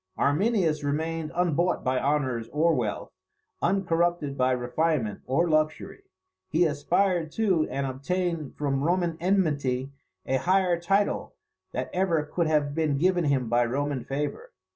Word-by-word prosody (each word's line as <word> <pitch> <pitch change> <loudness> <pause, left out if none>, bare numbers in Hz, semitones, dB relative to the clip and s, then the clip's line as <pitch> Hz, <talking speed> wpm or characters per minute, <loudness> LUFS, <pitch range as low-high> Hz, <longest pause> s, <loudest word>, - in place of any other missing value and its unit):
Arminius 160 -1 +1
remained 160 +2 -2
unbought 175 0 +1
by 130 0 +1
honours 130 -5 -1
or 165 +3 +2
wealth, 115 -7 -2 0.5
uncorrupted 175 -5 +1
by 130 -1 +2
refinement 125 -2 -1
or 140 +7 +2
luxury. 155 - 0 0.5
He 170 +3 +3
aspired 170 +2 +1
to 190 -8 +1
and 135 +1 -2
obtained 155 +3 -2
from 140 -2 -1
Roman 175 0 +1
enmity 145 -8 0 0.3
a 130 - +1
higher 180 +2 +2
title 195 +4 0 0.4
than - - -3
ever 175 -4 +1
could 165 +2 -1
have 150 -2 +1
been 155 -2 0
given 175 +2 +2
him 135 -4 +1
by 120 +1 +3
Roman 135 +2 -2
favour. 150 - -4
155 Hz, 135 wpm, -27 LUFS, 140-175 Hz, 0.5 s, He